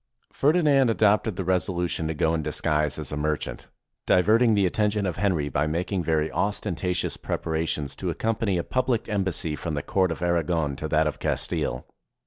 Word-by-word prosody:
Ferdinand 145 -4 +3
adopted 105 -1 +2
the 95 - -3
resolution 90 -3 0
to 80 - -3
go 80 +2 +1
in 80 - 0
disguise 75 -1 0
as 75 - -5
a - - -2
merchant, 75 +1 -3 0.4
diverting 110 +5 +4
the 100 -2 +3
attention 105 +2 0
of 90 - -2
Henry 90 -7 +1
by 75 +2 0
making 90 +4 -1
very 80 -1 0
ostentatious 95 -3 -1
prepara 80 0 -2
tions 75 -3 -2
to - - -3
accompany 110 -4 -1
a 85 - -1
public 130 -3 -1
embassy 95 -7 0
from 75 0 -4
the 75 - -3
Court 95 -3 +1
of 80 - -4
Aragon 85 -4 0
to 80 +3 -4
that 80 +1 +2
of 75 - -2
Castile. 65 - -2
90 Hz, 175 wpm, -25 LUFS, 80-105 Hz, 0.4 s, diverting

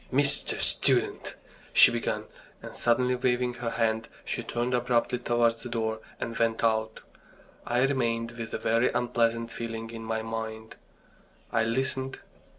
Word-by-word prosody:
"Mr. 140 +2 +2
Student!" - - +1 0.4
she - - +8
began, - - -2 0.4
and - - -8
suddenly, 125 +2 +2
waving 125 0 +1
her 120 -1 -3
hand, 115 0 0 0.2
she - - -2
turned 120 +2 -2
abruptly 120 0 +1
towards 120 -1 +1
the 120 - -7
door 110 -1 -1 0.2
and 115 - -4
went 115 0 +1
out. 110 -1 +1 0.7
I 120 +2 +3
remained 115 -4 0
with 115 -1 -7
a - - 0
very 115 +2 +2
unpleasant 115 -1 0
feeling 115 -1 -5
in 115 -1 -7
my 110 0 -2
mind. 110 0 -5 0.8
I 115 -1 +2
listened. 130 +2 -1
115 Hz, 145 wpm, -28 LUFS, 115-125 Hz, 0.8 s, she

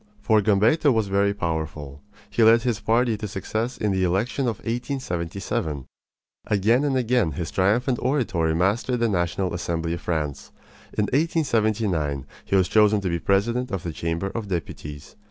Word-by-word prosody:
For 105 +1 +3
Gambetta 110 +9 +3
was 110 -4 +1
very 100 +1 +2
powerful. 80 -6 -4 0.3
He - - -1
led 115 +1 +6
his 120 -5 0
party 115 0 +2
to 105 0 -5
success 110 +4 -3
in 105 - 0
the 95 -1 +1
election 105 +9 0
of 115 - 0
1877. 90 - -3 0.6
Again 110 +6 +3
and 140 -3 +1
again 120 - +1
his 80 +3 -4
triumphant 120 +7 +1
oratory 95 - +1
mastered 110 +8 +1
the 115 - +2
National 90 -2 -1
Assembly 85 -1 -2
of 85 - -5
France. 75 -5 -3 0.4
In 105 - +1
1879 110 - 0 0.2
he - - -1
was 95 -2 +4
chosen 105 -1 +4
to 95 - -1
be 85 0 -1
president 115 +8 +1
of 95 -5 -3
the 85 - -4
Chamber 85 +4 -2
of 115 -3 -4
Deputies. 75 -5 -6
100 Hz, 160 wpm, -24 LUFS, 85-115 Hz, 0.6 s, led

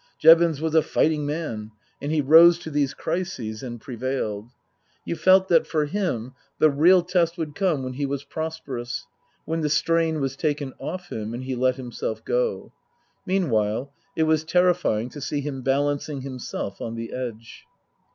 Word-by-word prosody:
Jevons 165 -2 +6
was 160 0 -2
a 160 - +6
fighting 150 -1 +1
man, 145 -9 -4 0.3
and 145 - -3
he 155 -1 +2
rose 165 +4 +7
to 160 -2 -8
these 145 -2 0
crises 125 - -3
and 120 -2 -6
prevailed. 120 -3 -4 0.6
You - - -2
felt 185 +4 +5
that 165 -2 +4
for 155 -2 0
him 145 - -2 0.2
the 155 - +5
real 170 +6 +5
test 175 -1 +1
would 155 -3 -4
come 170 -6 0
when 130 0 -4
he 140 +2 -2
was 140 0 -3
prosperous, 140 -5 -5 0.4
when 165 0 -2
the 150 - 0
strain 165 +1 +1
was 135 -1 -2
taken 145 -2 -2
off 180 +1 -6
him 110 +1 -4
and 125 - -6
he 130 0 -3
let 130 0 +1
himself 120 -3 -5
go. - - -1 0.6
Meanwhile 135 - 0 0.2
it 160 - +2
was 155 -1 +2
terrifying 175 -9 +2
to 145 - -9
see 145 +1 -2
him 135 -2 -5
balancing 140 +1 0
himself 130 -6 -6
on 115 0 -4
the 115 0 -6
edge. 115 -3 -7
145 Hz, 170 wpm, -24 LUFS, 130-165 Hz, 0.6 s, rose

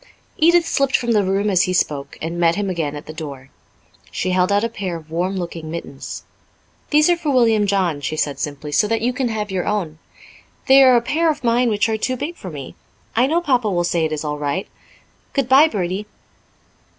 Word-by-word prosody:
Edith 340 +1 +5
slipped 275 -1 +2
from 240 -1 -2
the 210 -3 +3
room 195 +2 0
as 185 -4 +3
he 185 - -1
spoke, 145 -5 -1
and 165 +2 -3
met 170 -1 +3
him 200 -1 -2
again 155 -5 -2
at 145 - -8
the 155 - -8
door. 140 -4 -8 0.6
She 185 - -2
held 180 +1 +2
out 205 +1 +2
a - - +2
pair 200 -6 -5
of 160 -1 -11
warm 180 +4 -1
looking 170 -3 -5
mittens. 160 -4 -7 0.7
"These 300 0 +4
are - - +4
for 325 -3 -4
William 225 -6 +3
John," 185 -7 0
she 155 +2 -3
said 145 -2 -1
simply, 150 0 -5
"so 180 +8 +3
that 225 0 0
you 245 +2 0
can 255 0 -1
have 210 -2 -3
your 185 -2 -2
own. 175 -7 -2 0.7
They 270 +1 +7
are 260 -2 +7
a 240 - +4
pair 320 +7 +1
of 295 -3 -2
mine 240 +1 +2
which 210 0 +1
are 220 -1 -1
too 255 +4 -2
big 295 +7 -4
for 185 - -8
me. 145 -5 -8 0.4
I 245 +3 +3
know 330 +4 +1
Papa 250 -9 +1
will 175 -3 0
say 170 -1 0
it 160 - -1
is 155 -1 -3
all 150 0 -3
right. 150 +6 -2 0.7
Goodbye, 275 +2 +5
Bertie." 195 - -3
200 Hz, 220 wpm, -20 LUFS, 165-245 Hz, 0.7 s, They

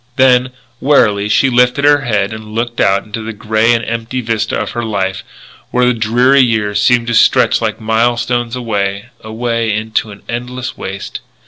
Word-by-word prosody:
Then, 130 -1 +4 0.3
wearily, 105 -8 +2
she 135 +5 +3
lifted 125 +3 +2
her 145 -1 +5
head 105 -5 -1
and 110 0 -9
looked 120 +1 -3
out 100 0 +2
into 110 +1 -6
the 115 +1 -6
grey 110 +2 +1
and 115 -1 +1
empty 115 +2 -3
vista 115 -3 -2
of 105 - -3
her 120 - -4
life, 95 -3 -2 0.5
where 125 0 +1
the 125 - +3
dreary 120 +5 +3
years 105 -4 +1
seemed 120 +2 +3
to 120 - -2
stretch 110 - +3
like - - -2
milestones 120 +2 0
away, 105 -3 -3
away 115 +1 -2
into 110 +1 -2
an 100 -1 -12
endless 125 +2 -5
waste. 95 +1 -6
115 Hz, 175 wpm, -14 LUFS, 105-125 Hz, 0.5 s, her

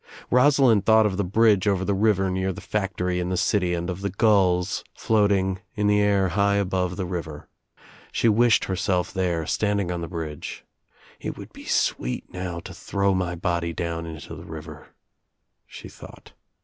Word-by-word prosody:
Rosalind 125 -5 +5
thought 110 +1 +5
of 95 -3 0
the 100 - +1
bridge 105 +1 +3
over 95 -2 +1
the 100 - +1
river 95 -2 +2
near 95 +1 -1
the - - -8
factory 90 -3 -2
iri 90 0 -2
the 90 - -1
city 90 -2 +1
and 85 0 -3
of 90 0 -4
the 100 - -1
gulls 95 -3 +2
floating 100 -3 +1 0.2
in 105 - -1
the 105 0 +4
air 100 -2 +2
high 100 +3 +2
above 90 -2 0
the 95 - -3
river. 85 -4 -6 0.6
She - - +1
wished 115 0 +4
herself 95 -1 -1
there, 85 -3 -1
standing 100 -2 0
on 85 -1 -3
the 85 - -4
bridge, 80 -4 -6 0.5
"It - - -5
would - - -11
be - - -12
sweet 60 +1 -1
now 90 -2 -4
to 95 +2 -9
throw 100 +2 0
my 90 -1 -1
body 85 -1 -1
down 85 0 -3
into 80 -3 -8
the - - -10
river," - - -9 0.8
she - - -10
thought. - - -14
95 Hz, 175 wpm, -24 LUFS, 90-100 Hz, 0.8 s, Rosalind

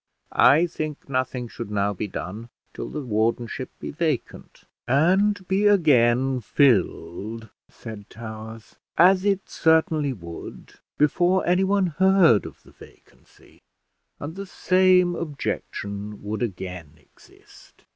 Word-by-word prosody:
"I 155 +5 +5
think 155 -3 -6
nothing 130 -2 -2
should 115 -1 -8
now 100 0 0
be 105 +2 -4
done 105 +5 -7 0.2
till - - -6
the 150 - -5
wardenship 115 +3 -1
be - - -6
vacant." 155 -4 -4 0.2
"And 190 +9 +2
be 200 +2 +2
again 130 - +3
filled," 110 - 0 0.2
said 110 -3 -10
Towers, 110 0 -10 0.2
"as 185 +2 +5
it 195 -1 0
certainly 160 -3 +2
would, 85 -8 -10 0.2
before 175 +5 +2
anyone 190 +2 +2
heard 190 - +5
of - - -14
the - - -18
vacancy; - - -20 0.6
and 150 +3 -6
the 195 0 -7
same 185 -1 +3
objection 105 -10 -5
would 105 +2 -4
again 90 -8 -5
exist. 75 - -21
135 Hz, 115 wpm, -24 LUFS, 110-175 Hz, 0.6 s, I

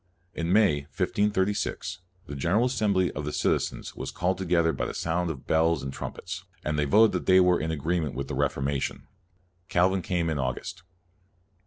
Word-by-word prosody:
In 85 +1 -2
May, 100 -7 +4 0.2
1536, 95 -1 0 0.3
the 70 - -7
General 90 - +2
Assembly 105 -7 +1
of 75 - -5
the 75 - -3
citizens - - -1
was - - -5
called 90 +1 -1
together 85 -3 +2
by - - -2
the - - -6
sound 85 +1 -1
of 70 -5 -6
bells 80 -2 +2
and 65 0 -5
trumpets, - - -6 0.2
and 75 0 0
they 75 - +2
voted 110 +9 +5
that - - -3
they 95 0 +7
were 90 -1 +4
CALVIN 80 - -2
109 - - 0
in 80 - -3
agreement 80 -1 -1
with 70 - -3
the - - -5
Reformation. 70 0 -1 0.6
Cal 90 +2 +3
vin 95 -1 -1
came 85 -1 -1
in 75 - -2
August. 65 +5 -3
85 Hz, 190 wpm, -27 LUFS, 75-95 Hz, 0.6 s, they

